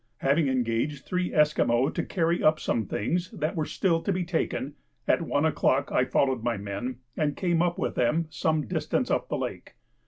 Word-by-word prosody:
Having 140 +3 +2
engaged 130 +2 -1
three 180 -1 -1
Esquimaux 145 -4 +3
to - - -2
carry 170 -1 0
up 155 0 +4
some 110 -4 -1
things 175 - -1
that 155 +5 -3
were 155 -2 0
still 165 -4 +1
to 200 - -1
be 180 -1 0
taken, 160 -4 -2 0.3
at - - +3
one 150 -2 0
o'clock 140 -3 +1
I 125 - +3
followed 130 -1 +1
my 120 -1 -1
men 100 +6 -4 0.2
and 150 -2 -1
came 175 -3 +1
up 175 0 +1
with - - -1
them 155 +7 +1
some 155 0 0
distance - - -1
up - - 0
the - - -1
lake. - - -6
150 Hz, 190 wpm, -27 LUFS, 125-165 Hz, 0.3 s, up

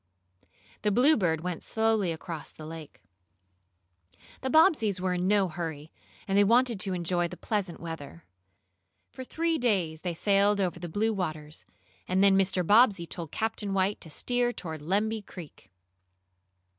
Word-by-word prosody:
The 210 - +1
Bluebird 205 - +3
went 180 -1 -4
slowly 220 -5 +1
across 165 -1 -6
the 155 - -11
lake. 155 - -10 1.4
The 265 - -2
Bobbseys 275 - +4
were 185 0 -1
in 180 0 -1
no 200 -1 +3
hurry, 160 -2 -6 0.4
and 195 - 0
they 205 - +6
wanted 235 +1 +3
to 195 -1 0
enjoy 175 0 0
the - - -10
pleasant 200 -5 -3
weather. 145 - -8 0.9
For 260 - -8
three 330 +4 -1
days 185 -10 0
they 175 -2 -3
sailed 200 +3 +2
over 180 -3 -1
the 175 0 -6
blue 220 +6 0
waters, 155 -5 -5 0.4
and 185 +1 +2
then 195 -1 +6
Mr. 190 -2 +2
Bobbsey 205 -3 +5
told 165 -2 -6
Captain 210 -3 -2
White 195 +2 0
to 165 - -8
steer 245 +8 0
toward 160 -9 -7
Lemby 210 +7 0
Creek. 180 -6 -12
190 Hz, 150 wpm, -28 LUFS, 170-215 Hz, 1.4 s, they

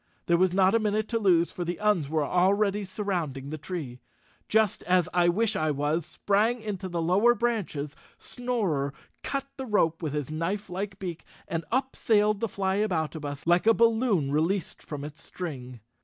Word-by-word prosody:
There 170 - +3
was 185 +1 +3
not 190 +1 +4
a 230 - +4
minute 215 0 0
to 230 - 0
lose, 175 -5 +3
for 180 - -4
the 175 0 -3
Uns 205 -9 +2
were 155 -1 +1
already 200 +4 +2
surrounding 175 -9 -3
the 155 - -5
tree. 145 -7 -6 0.5
Just 220 -2 +2
as 180 -2 +3
I 175 -1 +4
wish 215 +5 +1
I 155 0 +1
was 150 +3 0
sprang 215 +4 +1
into 200 -4 -5
the 175 -1 -2
lower 200 +8 +4
branches, 205 -12 -2 0.2
Snorer 190 - -2 0.3
cut 275 -1 -2
the 265 -1 -5
rope 165 -7 +2
with 155 -4 -3
his 150 -1 -3
knifelike 190 +4 -3
beak 175 -4 -6 0.2
and 165 0 -2
up 260 +2 0
sailed 210 -2 +2
the 230 - -1
Flyaboutabus 165 -8 -2
like 175 +5 +3
a 225 - +7
balloon 225 - +2
released 165 +6 0
from 145 -2 -7
its 150 +2 -8
string. 130 -9 -7
185 Hz, 170 wpm, -27 LUFS, 155-210 Hz, 0.5 s, a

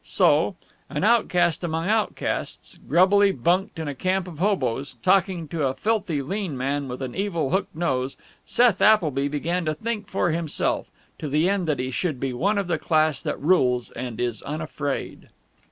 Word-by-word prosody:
So, - - +3 0.3
an - - -3
outcast 180 -8 +3
among 165 0 -2
outcasts, 220 0 -2
grubbily 195 +6 +5
bunked 175 +7 0
in 160 -2 -4
a 145 - -2
camp 185 +6 -1
of 165 -4 -9
hoboes, 145 - 0
talking 185 -3 +2
to 155 -3 0
a 130 - -2
filthy 195 -10 -1
lean 185 -1 -3
man 140 +2 -1
with 125 +1 -5
an 130 - -5
evil 170 -8 -1
hooked 190 -4 -1
nose, 135 -5 -1 0.3
Seth 240 -5 +3
Appleby 155 -10 +4
began 165 +5 -1
to 155 0 0
think 220 +3 -4
for 175 -3 0
himself, 165 -2 -1 0.3
to 150 - -4
the 155 +5 +2
end 195 -3 0
that 150 -3 +1
he 130 +1 -3
should 155 -1 -2
be 135 -1 -2
one 200 +12 +1
of 200 - 0
the 170 -3 -1
class 155 -3 +2
that - - -3
rules 130 -7 +2
and 120 -2 -6
is 120 -3 -2
unafraid. 150 -2 -4
160 Hz, 175 wpm, -24 LUFS, 140-190 Hz, 0.3 s, grubbily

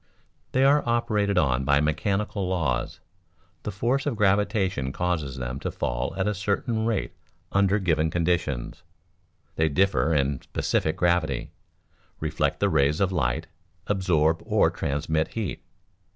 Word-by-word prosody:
They 130 - +3
are 145 +2 +5
operated 105 -4 +1
on 65 -6 +2
by 70 +1 +3
mechanical 95 +6 -1
laws; 65 -10 -1 0.6
the 105 - -4
force 120 +8 0
of 140 - 0
gravitation 100 - +1
causes 80 -5 -2
them 65 +1 -4
to - - -3
fall - - -2
at 95 +1 0
a 105 - +1
certain 110 +3 -1
rate 115 -3 -1 0.4
under 100 +1 +3
given 80 -5 +1
conditions. 80 -3 -1 0.8
They 80 0 +3
differ 90 0 +2
in 70 -1 0
specific 80 - -1
gravity, 85 -7 +1 0.7
reflect - - -1
the - - +2
rays 70 +3 +2
of 95 -1 +2
light, 65 -9 0 0.4
absorb 85 -5 +1
or - - +3
transmit 80 +3 -1
heat. 110 -7 -3
90 Hz, 135 wpm, -26 LUFS, 75-100 Hz, 0.8 s, are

